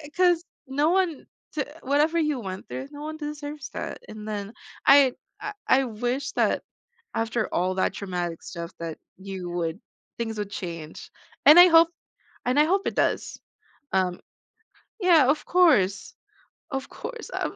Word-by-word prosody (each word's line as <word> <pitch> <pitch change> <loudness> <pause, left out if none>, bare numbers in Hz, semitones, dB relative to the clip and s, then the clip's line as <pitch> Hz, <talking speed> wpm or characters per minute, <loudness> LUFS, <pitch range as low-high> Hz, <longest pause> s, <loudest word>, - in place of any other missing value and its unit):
'cause 355 -2 +4 0.2
no 290 +4 +1
one 360 -5 0 0.3
to 295 -3 -1 0.2
whatever 300 +5 +2
you 300 -5 +1
went 190 -3 -6
through, 265 - -5
no 290 0 -9
one 310 0 -5
deserves 295 -1 -6
that, - - -5
and 215 -1 -9
then 205 0 -4 0.3
I 275 -2 +7 0.3
I 420 0 -4
I 270 +1 +5
wish 245 +4 -2
that - - +1 0.5
after 225 0 -1
all 185 +1 +1
that 190 - +1
traumatic 175 -4 -4
stuff 170 +1 -7
that 165 -2 -5 0.2
you 190 -2 -6
would 170 +1 -3 0.4
things 225 -2 -3
would 205 -1 -4
change 165 -5 -7 0.3
and 310 +4 +10
I 360 - +11
hope 330 0 +7 0.6
and 255 +4 +2
I 300 - +6
hope 385 +4 +1
it - - -2
does, - - 0 0.5
um 185 -2 +1 0.8
Yeah, 335 -8 +6
of 300 - +1
course, 250 - +3 0.6
of 270 -1 -3
course, 470 -1 -8
um - - -2
260 Hz, 155 wpm, -26 LUFS, 190-310 Hz, 0.8 s, I